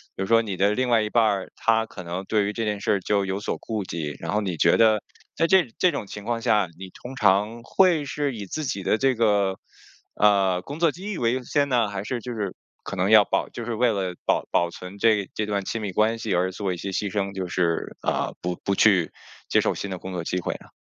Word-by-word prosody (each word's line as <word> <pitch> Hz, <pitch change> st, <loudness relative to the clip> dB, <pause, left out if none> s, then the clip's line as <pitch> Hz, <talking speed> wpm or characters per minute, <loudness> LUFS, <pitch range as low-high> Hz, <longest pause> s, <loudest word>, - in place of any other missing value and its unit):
比 95 Hz, -, -3 dB
如 -, -, -1 dB
说 115 Hz, +2 st, +4 dB
你 100 Hz, -4 st, -4 dB
的 100 Hz, +3 st, +3 dB
另 130 Hz, +2 st, 0 dB
外 115 Hz, -2 st, +4 dB
一 105 Hz, -, -2 dB
半 115 Hz, -, +3 dB
儿， 100 Hz, -4 st, 0 dB
他 115 Hz, 0 st, +2 dB
可 95 Hz, -, -10 dB
能 90 Hz, +3 st, -4 dB
对 105 Hz, 0 st, +1 dB
于 105 Hz, -, -2 dB
这 115 Hz, -, -2 dB
件 105 Hz, -1 st, -1 dB
事 105 Hz, -, 0 dB
儿 100 Hz, -, +2 dB
就 100 Hz, +1 st, +1 dB
有 95 Hz, +2 st, -3 dB
所 -, -, -2 dB
顾 110 Hz, -3 st, -4 dB
忌。 75 Hz, -5 st, -4 dB
然 -, -, -3 dB
后 105 Hz, -, +1 dB
你 95 Hz, -5 st, -2 dB
觉 -, -, +4 dB
得 110 Hz, -2 st, +4 dB, 0.3 s
在 165 Hz, -, +2 dB
这 185 Hz, -5 st, +4 dB
这 180 Hz, -, +3 dB
种 105 Hz, -8 st, -4 dB
情 105 Hz, +1 st, -8 dB
况 115 Hz, 0 st, -2 dB
下， 105 Hz, -7 st, +2 dB
你 95 Hz, -1 st, -8 dB
通 125 Hz, +2 st, -10 dB
常 105 Hz, +3 st, +2 dB
会 165 Hz, +2 st, +3 dB
是 145 Hz, -1 st, -2 dB
以 105 Hz, -3 st, -6 dB
自 155 Hz, +11 st, -4 dB
己 100 Hz, -8 st, -3 dB
的 110 Hz, -, +2 dB
这 135 Hz, 0 st, +2 dB
个， 100 Hz, -4 st, +2 dB, 0.5 s
呃， 95 Hz, -3 st, +3 dB
工 145 Hz, -, -8 dB
作 165 Hz, -3 st, +3 dB
机 195 Hz, +4 st, -6 dB
遇 190 Hz, -, -4 dB
为 115 Hz, 0 st, +1 dB
优 130 Hz, -1 st, -2 dB
先 145 Hz, +2 st, +1 dB
呢， 120 Hz, -5 st, +2 dB
还 100 Hz, 0 st, -5 dB
是 120 Hz, -1 st, -3 dB
就 125 Hz, +1 st, -5 dB
是 100 Hz, -4 st, -4 dB, 0.3 s
可 100 Hz, -, -6 dB
能 95 Hz, +2 st, +1 dB
要 105 Hz, -2 st, +8 dB
保 -, -, -1 dB
就 120 Hz, -, -7 dB
是 120 Hz, -, -3 dB
为 120 Hz, +1 st, +2 dB
了 95 Hz, -3 st, -2 dB
保 -, -, +1 dB
保 85 Hz, 0 st, +2 dB
存 90 Hz, +3 st, -10 dB
这 105 Hz, -2 st, +2 dB
这 105 Hz, -, -1 dB
段 100 Hz, -2 st, -1 dB
亲 115 Hz, -, -3 dB
密 100 Hz, -3 st, -3 dB
关 110 Hz, +3 st, +2 dB
系 110 Hz, -4 st, -2 dB
而 90 Hz, +1 st, +1 dB
做 95 Hz, -2 st, -2 dB
一 -, -, -6 dB
些 100 Hz, +3 st, -5 dB
牺 100 Hz, +1 st, -1 dB
牲， 100 Hz, 0 st, -2 dB
就 95 Hz, -2 st, -4 dB
是， 85 Hz, -2 st, -1 dB
呃， -, -, -1 dB
不 90 Hz, 0 st, -2 dB
不 100 Hz, -, 0 dB
去 95 Hz, -6 st, +4 dB, 0.4 s
接 -, -, +4 dB
受 -, -, +1 dB
新 100 Hz, -, -5 dB
的 95 Hz, -, -3 dB
工 95 Hz, +1 st, -8 dB
作 85 Hz, -2 st, -3 dB
机 90 Hz, +2 st, -2 dB
会 -, -, -3 dB
呢？ -, -, -15 dB
105 Hz, 285 characters per minute, -24 LUFS, 95-115 Hz, 0.5 s, 要